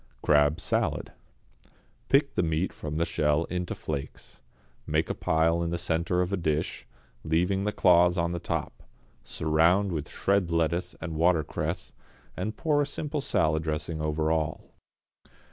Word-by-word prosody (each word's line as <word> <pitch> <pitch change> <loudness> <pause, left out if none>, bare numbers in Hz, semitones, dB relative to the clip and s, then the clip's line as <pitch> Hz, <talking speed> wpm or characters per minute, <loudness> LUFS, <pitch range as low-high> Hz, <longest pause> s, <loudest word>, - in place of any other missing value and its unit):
=Crab, 75 0 +4
Salad.= - - -1 1.0
Pick - - +3
the - - +1
meat 80 +2 -1
from 75 0 -5
the 85 - +2
shell 75 -2 +1
into 90 -1 -2
flakes, 70 -3 -6 0.5
make - - 0
a - - 0
pile 80 +1 +1
in 85 - -1
the 85 - -1
centre 85 +1 0
of 90 +2 -1
a - - +1
dish, 80 -3 -2 0.4
leaving 90 +5 +1
the 105 - +1
claws 90 -2 +4
on 85 0 0
the 85 - -3
top; - - -4 0.4
surround 85 +6 +2
with 75 -3 -4
shred 100 -3 +1
lettuce 85 +1 0
and 80 -2 -4
watercress, 85 -2 0 0.4
and 105 +4 -4
pour 150 -3 +2
a 145 - 0
simple 150 0 -3
salad 80 - +1
dressing 80 0 -3
over 75 +1 0
all. 80 -1 -2
85 Hz, 150 wpm, -27 LUFS, 80-90 Hz, 1.0 s, =Crab